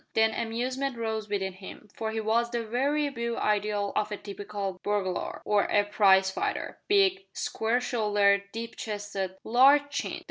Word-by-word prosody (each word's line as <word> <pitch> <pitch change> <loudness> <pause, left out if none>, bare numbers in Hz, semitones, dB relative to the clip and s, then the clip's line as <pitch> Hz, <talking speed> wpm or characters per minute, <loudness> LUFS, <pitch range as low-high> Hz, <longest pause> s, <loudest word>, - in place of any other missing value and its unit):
Then 220 0 +4
amusement 255 +3 -2
rose 220 -2 -3
within 190 -2 -1
him, 190 +3 -11
for 220 - -3
he 220 0 -2
was 225 +2 +1
the 235 -1 -2
very 280 +6 +1
beau 235 -3 -3
ideal 205 -1 0
of 210 0 0
a 210 - -3
typical 200 -2 -5
burglar, 200 -3 -2
or 210 -1 +3
a 205 - +3
prize 195 -2 +4
fighter: - - -3
big, 390 -1 +3
square 225 +2 0
shouldered, 205 -5 +2
deep 230 +1 -6
chested, 205 -3 -4
large 280 +5 +5
chinned. 285 - -3
220 Hz, 155 wpm, -28 LUFS, 205-240 Hz, -, large